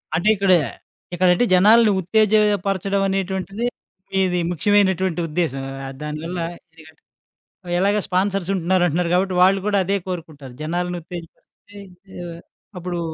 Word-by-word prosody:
అంటే 175 +6 +2
ఇక్కడ, 195 -1 +1 0.6
ఇక్కడంటే 180 +5 +3
జనాలని 215 +4 +6
ఉత్తేజపరచడం 200 -1 +1
అనేటువంటిది, 195 +3 -2 0.6
ఇది 180 -1 0
ముఖ్యమైనటువంటి 190 -1 +2
ఉద్దేశ్యం. 150 -4 -2 0.2
ఆహ్, 135 0 -6
దానివల్ల 160 +4 -5 0.3
ఇదిగ 160 -1 -16 0.9
ఎలాగ 200 +3 +2
స్పాన్సర్సుంటున్నారంటున్నారు 180 -3 0
కాబట్టి, 185 0 +1
వాళ్ళు 195 +1 +4
కూడా 205 -1 +2
అదే 200 +2 +1
కోరుకుంటారు 155 -7 -7
జనాలను 175 +2 -2
ఉత్తేజించే 175 +4 -12 0.5
ఆహ్, 170 0 -8 0.4
అప్పుడు 175 -1 -4
185 Hz, 105 wpm, -21 LUFS, 170-195 Hz, 0.9 s, జనాలని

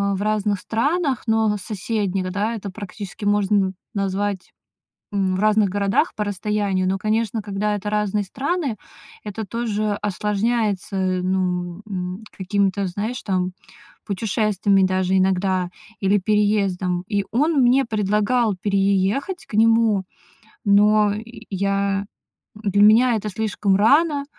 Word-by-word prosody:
в 190 - -4
разных 210 -1 0
странах, 275 - 0
но 220 -1 +2
в - - -11
соседних, 195 -2 -2
да, 205 +4 -1
это 205 -3 -5
практически 205 +1 -8
можно 205 -1 +2 0.2
назвать, 195 -1 -2 0.6
м, 190 -2 0
в - - -3
разных 215 -1 +3
городах 200 +1 +1
по 210 - -2
расстоянию. 205 -2 -1
Но, 190 - +1
конечно, 220 +1 -1
когда 205 +1 -1
это 205 0 -3
разные 210 -1 0
страны, 280 - -2 0.5
это 215 +1 -5
тоже 215 -1 -1
осложняется, 210 0 -1 0.3
ну, 180 0 -1
м, 185 +1 -5
какими-то, 200 0 0
знаешь, 210 +7 -3
там, 185 -2 -1 0.5
путешествиями 200 -1 +1
даже 185 0 +1
иногда 185 -1 +1 0.3
или 195 +1 +3
переездом. 195 -3 +1
И 200 -2 -1
он 290 +6 +2
мне 255 +2 +4
предлагал 215 +1 +1
переехать 200 - 0
к - - -17
нему, 225 -2 +3 0.6
но 210 +1 +5 0.4
я 200 0 0 0.5
для 205 -1 +1
меня 230 +4 +6
это 215 0 -3
слишком 205 -2 0
рано. 285 - +3
205 Hz, 125 wpm, -22 LUFS, 195-220 Hz, 0.6 s, меня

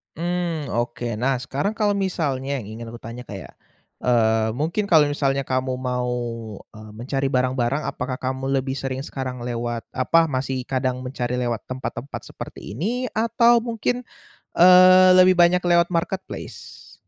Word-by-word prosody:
Mmm 170 -3 -2
oke, 120 -1 -2
nah 130 +2 0
sekarang 150 +9 -2
kalau 205 -2 +1
misalnya 140 -8 -2
yang 105 - -10
ingin 115 +2 -8
aku 115 +1 -10
tanya 120 +2 -8
kayak, 100 -4 -10 0.4
eee, 110 -2 +2
mungkin 160 - -1
kalau 160 -6 +5
misalnya 140 -1 0
kamu 130 -1 -1
mau, 125 -1 -2 0.6
eee, 110 0 -12
mencari 135 +5 -3
barang-barang, 125 +2 +1
apakah 130 -3 -4
kamu 130 +1 -3
lebih 135 0 -1
sering 135 -1 -3
sekarang 130 -3 -5
lewat 120 -1 -3
apa, 165 +5 +2
masih 130 -1 -2
kadang 130 -1 -1
mencari 125 -1 -4
lewat 120 -3 -2
tempat-tempat 130 +1 -6
seperti 100 - -9
ini? 240 - -2
Atau 235 +1 +3
mungkin, 240 +1 -2 0.5
eee, 185 +1 +7
lebih 185 0 +7
banyak 175 0 +4
lewat 175 -1 +4
marketplace? 180 +3 -5
135 Hz, 145 wpm, -23 LUFS, 125-175 Hz, 0.6 s, eee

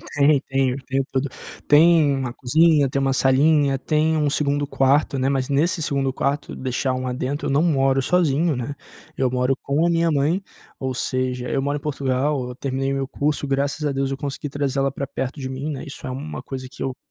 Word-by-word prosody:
Tem, 145 -1 +4
tenho, 135 -2 +1
tenho 135 0 0
tudo: 135 +1 -1 0.4
tem 155 -1 +5
1 130 -3 -3
cozinha, 150 +2 +3
tem 140 - -1
1 135 0 +1
salinha, 140 +1 +3
tem 155 +3 +1
1 150 - +1
2º 145 0 0
quarto, 135 0 +2
né, 130 +1 +1
mas 135 -2 -1
nesse 160 +4 +1
2º 140 -3 0
quarto 140 +2 -2
Deixar 130 0 -1
um 130 0 -3
adendo: 130 +3 -3
eu - - 0
não 140 +2 +3
moro 135 -5 +2
sozinho, 160 0 +2
né, 125 +3 -4 0.4
eu 130 -1 +2
moro 125 +1 +1
com 145 +4 +1
a - - +3
minha 165 0 +2
mãe, 150 +6 +1 0.4
ou 130 -1 -2
seja, 125 0 -2
eu 135 - 0
moro 145 +2 -1
em 145 - -9
Portugal, 135 -2 -1
eu 125 - -7
terminei 135 +1 -2
o - - -1
meu 135 -1 -2
curso. 145 0 -1
Graças 140 +2 -1
a 145 - +1
Deus 135 0 -1
eu 135 - -3
consegui 145 +1 -5
trazer 140 -1 -1
ela 135 0 +1
para 140 +1 -4
perto 135 +2 -4
de 130 - -4
mim, 135 +3 -4
né, 135 - -5
isso 140 -1 -8
é - - -3
1 140 +4 -6
coisa 130 -1 -7
que - - -13
eu 130 -1 -3
140 Hz, 220 wpm, -22 LUFS, 130-145 Hz, 0.4 s, tem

